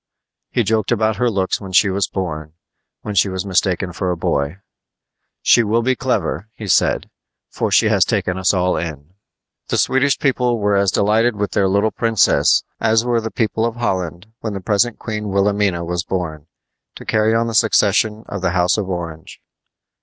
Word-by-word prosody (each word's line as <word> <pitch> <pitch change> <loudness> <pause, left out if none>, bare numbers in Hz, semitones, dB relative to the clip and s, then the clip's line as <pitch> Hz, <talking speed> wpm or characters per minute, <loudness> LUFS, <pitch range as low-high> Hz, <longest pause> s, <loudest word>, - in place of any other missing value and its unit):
He - - 0
joked 110 -1 0
about 110 -1 +1
her 125 -1 +1
looks 95 -3 -1
when 95 -2 -8
she 95 +1 +4
was 100 +1 0
born, 80 -5 -5 0.5
when 105 - -4
she 100 0 +3
was 95 0 -4
mistaken 95 -1 0
for 90 +1 -2
a 90 - -1
boy. 70 0 -1 0.9
"She - - +5
will 115 +1 +1
be 130 +2 +1
clever," 110 - -2
he 105 - -8
said, - - +2 0.4
"for - - -2
she - - +4
has - - +4
taken 90 - -1
us 95 0 +2
all 90 -1 +1
in!" 80 0 -6 0.5
The - - -1
Swedish 135 +1 +2
people 125 -3 +1
were 105 -1 +1
as 100 0 +3
delighted 110 +5 +2
with 105 0 -2
their 100 -3 +2
little 100 +3 +1
princess 115 -3 +3 0.2
as 110 +1 +2
were 120 -2 +1
the 110 - -4
people 110 0 -1
of 115 0 -1
Holland 90 -6 -3
when 110 -2 -4
the - - -3
present 105 +4 0
Queen 105 -2 -5
Wilhelmina 100 -3 +1
was 90 0 -2
born, 80 -5 -4 0.5
to - - -11
carry 110 +1 +2
on 115 +1 +2
the 115 - -4
succession 110 0 +2
of 100 - -5
the 90 -2 0
House 90 +4 +2
of 95 -2 -3
Orange. 85 -3 -6
100 Hz, 185 wpm, -19 LUFS, 90-110 Hz, 0.9 s, She